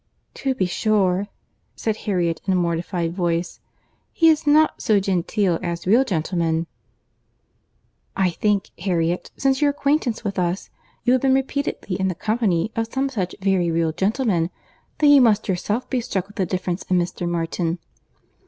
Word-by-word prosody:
"To 265 Hz, -1 st, -2 dB
be 190 Hz, -, +1 dB
sure," 195 Hz, 0 st, +1 dB, 0.5 s
said 220 Hz, -2 st, -1 dB
Harriet, 175 Hz, -6 st, -1 dB
in 190 Hz, -, +3 dB
a -, -, +2 dB
mortified 170 Hz, 0 st, -1 dB
voice, 175 Hz, -1 st, -1 dB, 0.5 s
"he 330 Hz, -1 st, +4 dB
is 310 Hz, -1 st, +2 dB
not 310 Hz, +2 st, +4 dB
so 215 Hz, -2 st, +3 dB
genteel 190 Hz, -1 st, 0 dB
as 170 Hz, -1 st, -4 dB
real 225 Hz, +8 st, +5 dB
gentlemen." 165 Hz, -4 st, -1 dB, 1.5 s
"I 190 Hz, -2 st, +2 dB
think, 205 Hz, +2 st, 0 dB
Harriet, 175 Hz, -1 st, -1 dB
since 270 Hz, 0 st, +1 dB
your 295 Hz, -, +4 dB
acquaintance 280 Hz, -5 st, 0 dB
with 200 Hz, -3 st, -2 dB
us, 175 Hz, +2 st, -2 dB, 0.3 s
you 245 Hz, -, +3 dB
have 255 Hz, -, +2 dB
been 265 Hz, -1 st, +3 dB
repeatedly 270 Hz, -8 st, -2 dB
in 190 Hz, -, +1 dB
the 185 Hz, -, -2 dB
company 215 Hz, -3 st, 0 dB
of 225 Hz, 0 st, -2 dB
some 270 Hz, +1 st, 0 dB
such 195 Hz, -9 st, -3 dB
very 190 Hz, -3 st, +2 dB
real 165 Hz, -1 st, +1 dB
gentlemen, 190 Hz, -, 0 dB, 0.5 s
that 310 Hz, -, +2 dB
you 290 Hz, -2 st, +8 dB
must 220 Hz, -3 st, +3 dB
yourself 205 Hz, +5 st, -1 dB
be 255 Hz, -2 st, -1 dB
struck 190 Hz, -5 st, -2 dB
with 205 Hz, +3 st, -18 dB
the 190 Hz, -3 st, 0 dB
difference 180 Hz, 0 st, -2 dB
in 185 Hz, -, +3 dB
Mr. 175 Hz, 0 st, -2 dB
Martin. 170 Hz, 0 st, -1 dB
190 Hz, 160 wpm, -22 LUFS, 175-230 Hz, 1.5 s, you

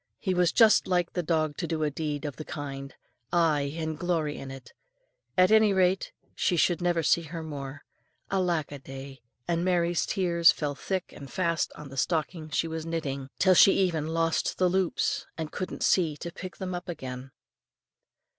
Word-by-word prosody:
He 190 Hz, -, -1 dB
was 180 Hz, -1 st, +3 dB
just 225 Hz, -2 st, +5 dB
like 175 Hz, -2 st, +1 dB
the 180 Hz, -, 0 dB
dog 155 Hz, -3 st, 0 dB
to 170 Hz, -, -2 dB
do 160 Hz, -1 st, -1 dB
a 150 Hz, -, +1 dB
deed 150 Hz, 0 st, -3 dB
of 145 Hz, -, -5 dB
the 155 Hz, -, -5 dB
kind, 140 Hz, -2 st, -6 dB, 0.4 s
aye, 155 Hz, -5 st, +2 dB
and 160 Hz, -2 st, -3 dB
glory 165 Hz, -4 st, 0 dB
in 135 Hz, -, -7 dB
it; 135 Hz, -1 st, -10 dB, 0.6 s
at 185 Hz, +2 st, +5 dB
any 220 Hz, -2 st, +6 dB
rate, 190 Hz, 0 st, +2 dB, 0.2 s
she 175 Hz, -, +1 dB
should 175 Hz, +1 st, +2 dB
never 175 Hz, -2 st, +1 dB
see 170 Hz, -, +4 dB
her 165 Hz, 0 st, -7 dB
more. 140 Hz, -3 st, -7 dB, 0.5 s
Alack 175 Hz, -6 st, 0 dB
a 145 Hz, -, -7 dB
day! 135 Hz, -1 st, -9 dB, 0.3 s
and 170 Hz, 0 st, 0 dB
Mary's 175 Hz, -2 st, +1 dB
tears 170 Hz, -4 st, +4 dB
fell 145 Hz, -2 st, -3 dB
thick 185 Hz, +5 st, -3 dB
and 140 Hz, -2 st, -10 dB
fast 170 Hz, -3 st, 0 dB
on 150 Hz, -2 st, -10 dB
the 135 Hz, -, -10 dB
stocking 160 Hz, +2 st, -1 dB
she 155 Hz, +2 st, 0 dB
was 160 Hz, 0 st, -4 dB
knitting, 140 Hz, -5 st, -3 dB
till 190 Hz, -1 st, +5 dB
she 195 Hz, +2 st, +7 dB
even 170 Hz, -6 st, +1 dB
lost 165 Hz, 0 st, 0 dB
the 185 Hz, -, +3 dB
loops, 185 Hz, -1 st, 0 dB
and 160 Hz, -2 st, -4 dB
couldn't 185 Hz, -, -4 dB
see 160 Hz, -5 st, +2 dB
to 170 Hz, -, -6 dB
pick 185 Hz, +2 st, -8 dB
them 185 Hz, -1 st, -4 dB
up 175 Hz, 0 st, -6 dB
again. 130 Hz, -5 st, -6 dB
165 Hz, 185 wpm, -28 LUFS, 145-180 Hz, 0.6 s, she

